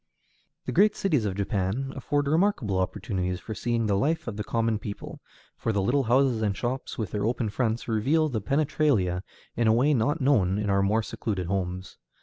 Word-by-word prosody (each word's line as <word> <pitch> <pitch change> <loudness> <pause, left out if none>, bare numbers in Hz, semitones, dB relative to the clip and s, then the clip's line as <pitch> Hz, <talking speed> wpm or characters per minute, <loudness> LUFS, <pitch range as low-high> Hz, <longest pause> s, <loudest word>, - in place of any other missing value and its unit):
The - - -2
great 205 +4 +4
cities 150 - +1
of 95 -2 -2
Japan 100 +6 -1
afford 145 +2 -1
remarkable 145 - +1
opportunities 90 -1 -2
for 110 - -6
seeing 115 +1 -1
the 100 -2 +1
life 155 +9 0
of 115 - -4
the 105 - -3
common 115 -1 0
people, 100 0 -7 0.4
for 115 - -2
the 100 - 0
little 135 +5 +2
houses 125 -1 +3
and 100 -3 0
shops, 125 +2 -3
with 110 -4 -3
their 105 -1 -1
open 115 -2 -1
fronts, 115 +1 -1
reveal 135 +8 +2
the 120 -7 -2
penetralia 135 - +1 0.3
in 115 -1 +1
a 110 - +5
way 135 +6 +3
not 145 +6 +1
known 110 -10 +3
in 105 -1 -1
our 100 0 +3
more 105 +3 +2
secluded 100 -4 -3
homes. 90 0 -3
115 Hz, 190 wpm, -27 LUFS, 100-135 Hz, 0.4 s, a